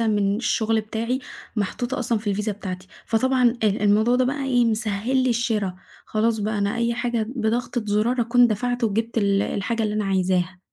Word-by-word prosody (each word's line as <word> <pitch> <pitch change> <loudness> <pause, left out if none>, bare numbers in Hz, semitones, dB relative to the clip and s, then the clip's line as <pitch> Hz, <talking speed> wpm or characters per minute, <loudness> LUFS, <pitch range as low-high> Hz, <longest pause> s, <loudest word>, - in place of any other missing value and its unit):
من 205 -3 +1
الشغل 225 -1 +1
بتاعي، 230 +4 -2 0.4
محطوطة 245 +6 -2
أصلًا 235 -2 0
في 205 -2 -2
الVisa 210 +2 -1
بتاعتي، 190 -2 -6 0.2
فطبعًا 250 +1 +2
آآ - - +4
الموضوع 210 +4 +3
ده 255 - +3
بقى 275 +2 -2
إيه 245 -3 +3
مسهّل 220 +2 0
لي 255 - +2
الشرا، 220 -6 -1 0.3
خلاص 220 +1 +1
بقى 210 0 -1
أنا 200 +3 0
أي 235 0 0
حاجة 240 -3 -1
بضغطة 235 +1 -1
زرار 220 +5 +1
أكون 240 +1 +4
دفعت 245 +2 -1
وجبت 225 +2 -1
ال 200 -1 +2
الحاجة 225 +3 -2
اللي 210 -1 -1
أنا 215 -1 0
عايزاها. 185 -1 0
220 Hz, 180 wpm, -23 LUFS, 205-240 Hz, 0.4 s, آآ